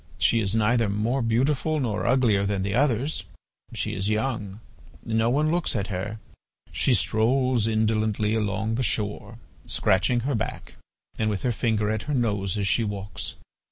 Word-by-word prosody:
She 115 - +3
is 100 -1 0
neither 115 0 +2
more 110 +6 0
beautiful 135 +7 +1
nor 115 -4 -1
uglier 115 -6 +3
than 100 -1 -1
the 100 0 -2
others; 130 -2 +1 0.5
she - - -3
is 95 +2 -1
young. 110 -3 -2 0.5
No 110 0 +1
one 150 +5 +2
looks 175 -5 0
at 100 -1 -2
her. 100 +4 -4 0.5
She 130 - +2
strolls 120 +3 +2
indolently 110 -1 +1
along 110 0 -1
the 120 - -1
shore, 105 -4 -2 0.3
scratching 120 +6 +2
her 140 +4 -1
back 115 - -4 0.5
and 110 - +1
with 105 -2 -3
her 125 - +1
finger 110 -2 0
at 110 -1 -1
her 145 - +1
nose 105 -6 0
as 100 -1 0
she 115 - +3
walks. 100 -1 -4
110 Hz, 160 wpm, -25 LUFS, 105-125 Hz, 0.5 s, She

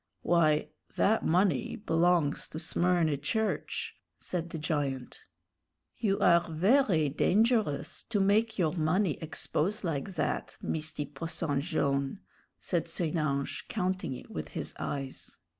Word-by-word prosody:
"Why, 155 -3 +3 0.3
that 220 +2 +3
money 175 -6 +2
belongs 170 -7 +2
to - - -8
Smyrny 170 -4 +2
Church," 220 +9 -2 0.2
said 175 -1 -4
the 165 - -5
giant. 145 -5 -2 0.8
"You 200 -4 +1
are 170 0 +5
very 185 - +3
dengerous 210 - +1
to 215 -3 +1
make 215 +3 +2
your 165 -5 +2
money 165 +1 +1
expose 170 +5 -1
like 165 +2 -3
that, - - -2
Misty 155 -2 -2
Posson 145 0 -2
Jone'," 140 -1 0 0.4
said 170 -3 -1
St. 165 -1 -2
Ange, 140 -3 -1
counting 185 - -2
it 125 - -11
with 80 -1 -4
his - - -4
eyes. 135 -2 -5
165 Hz, 125 wpm, -30 LUFS, 150-190 Hz, 0.8 s, are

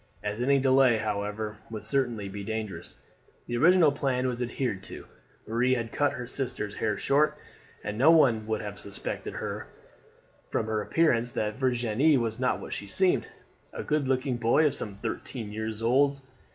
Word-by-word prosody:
As 105 +2 -3
any 140 +3 +4
delay, 130 -3 +4
however, 105 0 -3
would 110 -2 -6
certainly 120 -7 0
be 100 +1 -6
dangerous, 110 -1 -5 0.5
the 120 - -3
original 165 +3 +5
plan 130 -3 -1
was 125 -1 -3
adhered 120 -4 -2
to. - - -9 0.4
Marie 125 +4 +2
had 115 -2 -3
cut 145 0 +1
her 125 - -5
sister's 120 -5 -2
hair 105 -1 -1
short, 150 +2 +2 0.5
and 105 +1 -4
no 140 +5 +6
one 120 -10 +5
would 110 -1 -1
have 100 -1 -6
suspected 100 0 -5 1.1
from - - -1
her 110 -1 -1
appearance 120 -2 +2
that 105 -3 -2
Virginie 130 +2 +2
was 115 -1 -2
not 130 -1 +1
what - - -7
she 100 - -5
seemed, 185 - +2 0.5
a - - -5
good 150 -2 0
looking 130 -1 0
boy 120 +7 +3
of 150 - +3
some 100 -3 -2
thirteen 110 +1 -5
years 110 +1 -4
old. 140 +4 +3
120 Hz, 165 wpm, -28 LUFS, 110-135 Hz, 1.1 s, no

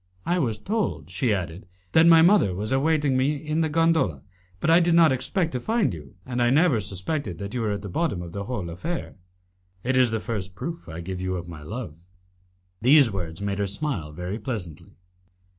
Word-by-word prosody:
"I 180 +1 +1
was 115 -8 0
told," 210 - -2
she 125 -5 0
added, 90 -2 -3 0.2
"that 160 +7 +6
my 165 -1 +8
mother 175 - +4
was 105 +6 -2
waiting 145 +1 +2
for 130 - +2
me 135 +3 +2
in 155 +2 -2
the 160 - +1
gondola, 160 - +2 0.4
but 160 - +2
I 165 - +7
did 170 -1 +3
not 165 -3 +6
expect 165 +6 -1
to 125 - -2
find 220 - +1
you, 75 -4 -10
and 125 -1 -2
I 120 - +4
never 145 -2 +4
suspected 100 - -3
that 100 +4 -6
you 125 - -2
were 110 - 0
at 100 0 -4
the - - -5
bottom 100 - -1
of 85 - -8
the 100 +2 -5
whole 100 -9 -4
affair." 165 - -5 0.7
"It 130 +2 0
is 130 -1 +5
the 110 0 -1
first 100 -5 -5
proof 170 - -6
I 80 +1 -6
give 90 +1 -5
you 95 0 -2
of 85 -1 -5
my 80 -3 -9
love." 105 +3 -6 0.9
These 135 0 +6
words 90 -1 -5
made 100 0 -2
her 100 - 0
smile 100 - -3
very 90 +7 -5
pleasantly. 90 - -6
115 Hz, 210 wpm, -25 LUFS, 95-155 Hz, 0.9 s, my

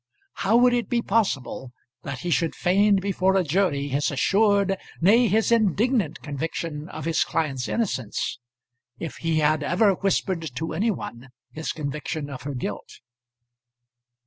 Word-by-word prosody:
How 220 +4 +4
would 245 0 +5
it 240 -1 0
be 240 -2 +1
possible 140 - -1 0.3
that 130 -1 -6
he 175 - -3
should 165 -1 +1
feign 200 +3 +3
before 190 0 +1
a 190 - +3
jury 150 -4 +1
his 140 +2 0
assured, 200 +6 +2 0.2
nay, 225 +8 +5
his 220 +3 +2
indignant 220 - +1
conviction 155 +1 -4
of 155 -1 -7
his 165 -1 +2
client's 135 -5 -2
innocence, 135 - -2 0.6
if 165 - -6
he 165 -1 0
had 155 0 +2
ever 190 +7 +3
whispered 190 -2 0
to 160 +5 -3
any 205 +9 +1
one 135 - -5 0.2
his 160 +1 -4
conviction 150 0 -4
of 130 - -7
her 145 -1 -5
guilt? 105 -5 -5
170 Hz, 145 wpm, -24 LUFS, 145-200 Hz, 0.6 s, would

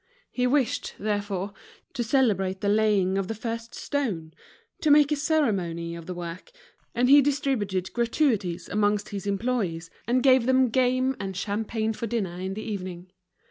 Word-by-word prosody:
He 250 0 +1
wished, 265 -2 0
therefore, 205 -2 -2 0.4
to 240 - -1
celebrate 205 -7 +1
the 200 - +1
laying 205 -3 +2
of 195 - -2
the 225 - -3
first 230 +1 -5
stone, 195 - -3 0.5
to 310 - +2
make 295 0 +6
a - - +3
ceremony 200 - 0
of 170 -1 -9
the 180 - -5
work, 175 - -7 0.4
and 245 +1 +3
he 285 +2 +8
distributed 255 -10 -1
gratuities 230 - 0
amongst 205 0 +1
his 200 -1 -5
employees, 195 -6 -1 0.2
and 250 +1 +2
gave 260 -3 +5
them 260 -1 +4
game 255 +2 +2
and 195 -2 -4
champagne 220 +2 -2
for 230 - -4
dinner 195 -6 -2
in 190 +1 -4
the 215 - -5
evening. 185 -4 -6
215 Hz, 160 wpm, -26 LUFS, 190-250 Hz, 0.5 s, he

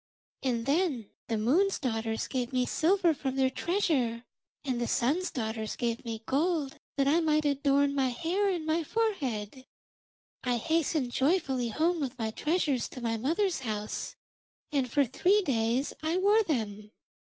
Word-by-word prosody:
And 240 -3 -1
then 280 - 0 0.2
the 225 - 0
Moon's 325 - +2
daughters 225 -3 -2
gave 250 -1 -2
me 255 -1 +1
silver 345 +4 +3
from 270 -2 -3
their 265 -1 +2
treasure, 270 - 0 0.4
and 250 -3 -1
the 240 - 0
Sun's 310 +10 +1
daughters 220 -2 -3
gave 235 -1 -2
me 225 -2 -5
gold 295 0 0 0.2
that 275 -1 +2
I 310 +4 +4
might 305 -2 +2
adorn 280 0 +2
my 270 -2 +2
hair 350 +10 0
and 340 -4 -2 0.2
forehead. 265 - -2 0.8
I 245 -1 +1
hastened 315 -1 0
joyfully 265 -4 +1
home 330 +8 +1
with 270 -3 -3
my 220 -2 -2
treasures 300 -2 0
to 255 - -9
my 230 -1 0
mother's 335 - 0
house, 215 -4 -4 0.6
and 270 -4 0
for 285 +1 +3
three 380 - +2
days 240 -1 0
I 320 +3 0
wore 410 +4 +4
them. 215 - -2
270 Hz, 150 wpm, -29 LUFS, 235-330 Hz, 0.8 s, I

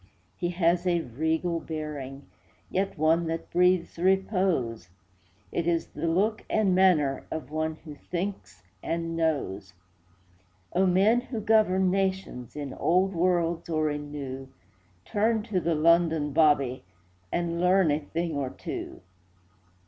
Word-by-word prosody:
He 175 - -2
has 175 0 +1
a 175 -1 +2
regal 160 +6 -1
bearing, 145 -4 -6 0.5
Yet 195 -1 -1
one 160 +2 +2
that 165 0 -4
breathes 180 -1 +2
repose; 185 - +1 0.6
It 170 -1 -1
is 170 -1 0
the - - -4
look 205 +6 +1
and 210 -4 +2
manner 170 -7 +3
Of 150 -3 -6
one 155 0 -1
who 150 - -8
thinks 175 - -5 0.2
and 165 0 -3
knows. 105 - -2 1.0
Oh, 185 +2 +3
men 200 +7 +4
who 245 -2 -5
govern 190 -4 +3
nations, 190 -11 -2
In 145 -3 -5
old 185 +3 +2
worlds 170 -1 0
or 155 -2 +1
in 145 0 -5
new, 135 -2 -6 0.5
Turn 220 +1 +1
to 210 -5 -1
the 170 -1 0
London 160 -2 +3
'Bobby' 145 -5 +3 0.5
And 170 0 -1
learn 180 -2 +4
a 145 - +1
thing 165 +3 -3
or 140 -2 -1
two. - - -7
170 Hz, 135 wpm, -27 LUFS, 150-185 Hz, 1.0 s, men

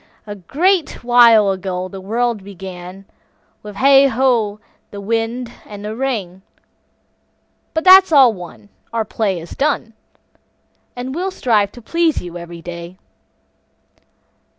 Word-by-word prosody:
A 205 - -6
great 320 - 0
while 235 -4 +5
ago 185 -1 -4
the 190 +1 -9
world 230 +1 -2
begun, 190 -1 -10 0.6
With 210 -1 -10
hey, 275 +4 +5
ho, 230 -5 0 0.3
the 205 - -9
wind 230 +3 -2
and 205 0 -10
the 215 +1 -5
rain, 215 -8 -3 1.3
But 320 - 0
that's 375 -1 +7
all 265 -6 +6
one, 180 +2 -12 0.2
our 230 -1 -1
play 200 -4 -2
is 165 +1 -11
done, 260 -5 -1 1.0
And 250 +1 -5
we'll 365 +5 -2
strive 215 - +1
to 240 - -13
please 335 +3 0
you 175 -1 -9
every 170 -1 -9
day. 170 +1 -8
220 Hz, 130 wpm, -18 LUFS, 190-255 Hz, 1.3 s, that's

